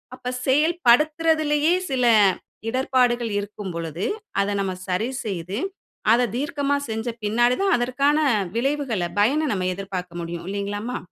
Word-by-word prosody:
அப்ப 250 -1 -5 0.2
செயல்படுத்துறதுலேயே 310 +1 +3 0.2
சில 255 -2 +1 0.6
இடர்பாடுகள் 245 -2 +1
இருக்கும் 205 -1 -6
பொழுது, 165 +1 -4 0.4
அத 200 - 0
நம்ம 190 -1 -2
சரி 185 +6 0 0.2
செய்து, 190 -1 -4 0.6
அத 245 +1 +3
தீர்க்கமா 285 +1 0
செஞ்ச 220 +2 -3 0.2
பின்னாடி 240 +4 +3
தான் 390 -2 +4
அதற்கான 255 +5 +1 0.4
விளைவுகள்ல 255 -8 0
பயன 285 +9 +3
நம்ம 185 -2 -1
எதிர்பார்க்க 180 -3 -6
முடியும் 170 0 -6
இல்லைங்களாம்மா? 205 +4 -3
240 Hz, 120 wpm, -23 LUFS, 200-280 Hz, 0.6 s, தான்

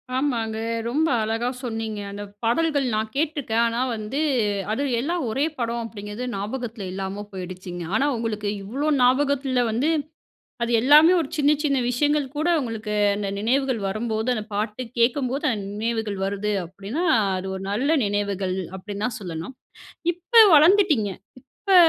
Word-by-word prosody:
ஆமாங்க 235 -5 -1 0.3
ரொம்ப 300 +7 +1
அழகா 225 +2 -1
சொன்னீங்க. 225 -3 -4
அந்த 205 +1 -6 0.2
பாடல்கள் 285 +4 +2
நான் 215 +1 -1
கேட்ருக்கேன். 285 -6 0
ஆனா 230 +1 -2 0.2
வந்து, 215 +6 -4 0.5
அது 225 +6 0 0.2
எல்லாம் 335 +6 -1
ஒரே 270 +7 +1
படம் 235 -1 -2
அப்டிங்றது 210 +2 -6
ஞாபகத்துல 225 +2 -4
இல்லாம 195 +2 -4
போயிடுச்சுங்க. 180 -1 -7
ஆனா 270 - +3
உங்களுக்கு 215 -3 -2
இவ்ளோ 270 +10 -2
ஞாபகத்துல 260 0 +2
வந்து, 250 +8 +1 0.7
அது 235 - -1
எல்லாமே 300 +7 +7
ஒரு 290 - -5
சின்ன 290 0 +4
சின்ன 280 -2 +2
விஷயங்கள் 290 +3 +1
கூட, 310 +3 0
உங்களுக்கு 225 -4 -4 0.2
அந்த 200 -1 -3
நினைவுகள் 255 +1 +1
வரும்போது 220 +3 -1
அந்த 215 -2 -4
பாட்டு 210 +4 -2 0.2
கேட்கும்போது, 255 +3 +1
அந்த 205 -3 -4
நினைவுகள் 220 -2 -2
வருது 200 +1 -2
அப்டின்னா, 200 - -4 0.3
அது 185 +1 -5
ஒரு 190 - -6
நல்ல 250 +8 0 0.2
நினைவுகள் 200 -2 -1 0.2
அப்டின்னு 205 +2 -4
தான் 235 -3 -5
சொல்லணும். 170 +6 -6 0.6
இப்ப 355 +8 -31 0.2
வளர்ந்துட்டீங்க. 305 - +5 0.5
இப்ப 395 -2 +3
230 Hz, 140 wpm, -24 LUFS, 205-275 Hz, 0.7 s, எல்லாமே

